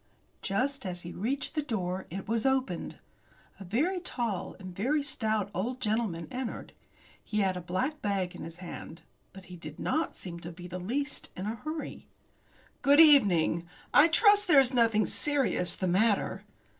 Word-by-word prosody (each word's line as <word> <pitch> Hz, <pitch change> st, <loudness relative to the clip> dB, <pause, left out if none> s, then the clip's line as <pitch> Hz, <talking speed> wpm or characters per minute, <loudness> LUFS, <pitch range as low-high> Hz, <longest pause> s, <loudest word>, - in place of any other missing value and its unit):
Just 265 Hz, +8 st, -1 dB
as 180 Hz, -3 st, -4 dB
he 175 Hz, -, -7 dB
reached 260 Hz, +9 st, -2 dB
the 305 Hz, -, 0 dB
door 190 Hz, -8 st, -3 dB
it 190 Hz, +3 st, -6 dB
was 225 Hz, +1 st, 0 dB
opened. 265 Hz, 0 st, 0 dB, 0.6 s
A -, -, -7 dB
very 295 Hz, -, 0 dB
tall, 230 Hz, -, -3 dB
and 185 Hz, -2 st, -9 dB
very 280 Hz, +9 st, +1 dB
stout, 220 Hz, -7 st, -1 dB
old 240 Hz, +8 st, -2 dB
gentleman 210 Hz, -8 st, -1 dB
entered. 255 Hz, -2 st, -5 dB, 0.5 s
He 210 Hz, -1 st, -1 dB
had 190 Hz, -2 st, +1 dB
a 180 Hz, -, -4 dB
black 255 Hz, -, -2 dB
bag 195 Hz, -3 st, -1 dB
in 180 Hz, -, -9 dB
his 165 Hz, 0 st, -8 dB
hand. 170 Hz, -2 st, -9 dB, 0.3 s
But 190 Hz, -1 st, -12 dB
he 180 Hz, -, -10 dB
did 155 Hz, -3 st, -9 dB
not 320 Hz, +1 st, -1 dB
seem 170 Hz, -2 st, -6 dB
to 170 Hz, +1 st, -8 dB
be 175 Hz, +1 st, -11 dB
the 180 Hz, +1 st, -6 dB
least 265 Hz, +10 st, -3 dB
in 185 Hz, -, -4 dB
a 215 Hz, -, -1 dB
hurry. 310 Hz, +7 st, -6 dB, 0.7 s
"Good 285 Hz, +2 st, +5 dB
evening. 190 Hz, -, +6 dB, 0.3 s
I 295 Hz, -, +8 dB
trust 410 Hz, +4 st, +5 dB
there 300 Hz, -5 st, +7 dB
is 265 Hz, -1 st, +3 dB
nothing 225 Hz, -3 st, +3 dB
serious 270 Hz, -, +1 dB
the 185 Hz, -, -2 dB
matter." 205 Hz, +4 st, +1 dB
215 Hz, 170 wpm, -30 LUFS, 180-270 Hz, 0.7 s, I